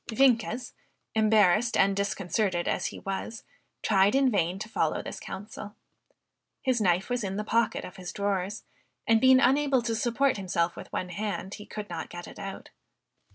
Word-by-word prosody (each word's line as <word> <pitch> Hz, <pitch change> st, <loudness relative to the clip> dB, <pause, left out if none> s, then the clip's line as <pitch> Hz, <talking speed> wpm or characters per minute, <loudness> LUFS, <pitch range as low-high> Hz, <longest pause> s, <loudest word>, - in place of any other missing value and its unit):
Vienkes, 240 Hz, 0 st, +2 dB, 0.4 s
embarrassed 215 Hz, 0 st, +4 dB
and 195 Hz, 0 st, +4 dB
disconcerted 195 Hz, -2 st, -1 dB
as -, -, 0 dB
he -, -, -7 dB
was, 195 Hz, +3 st, -5 dB, 0.4 s
tried 200 Hz, +2 st, +4 dB
in 270 Hz, -2 st, +4 dB
vain 180 Hz, -3 st, +1 dB
to 215 Hz, -, -6 dB
follow 225 Hz, -, 0 dB
this -, -, -6 dB
counsel. 205 Hz, +1 st, -8 dB, 0.9 s
His 255 Hz, -4 st, +1 dB
knife 180 Hz, 0 st, +2 dB
was 245 Hz, -2 st, -1 dB
in 195 Hz, -1 st, -3 dB
the 210 Hz, -, -1 dB
pocket 230 Hz, +2 st, 0 dB
of 180 Hz, -, -11 dB
his 180 Hz, -1 st, -6 dB
drawers; 200 Hz, 0 st, -2 dB, 0.4 s
and, 225 Hz, -1 st, +4 dB
being 260 Hz, 0 st, +7 dB
unable 270 Hz, -1 st, +3 dB
to 230 Hz, -1 st, -1 dB
support 240 Hz, +3 st, +1 dB
himself 175 Hz, -3 st, -1 dB
with -, -, -10 dB
one 180 Hz, -, -3 dB
hand, 200 Hz, +1 st, -4 dB
he 210 Hz, -, -9 dB
could 210 Hz, -1 st, -6 dB
not 170 Hz, -3 st, -5 dB
get 175 Hz, 0 st, -8 dB
it -, -, -11 dB
out. 195 Hz, -1 st, -7 dB
210 Hz, 170 wpm, -28 LUFS, 190-230 Hz, 0.9 s, being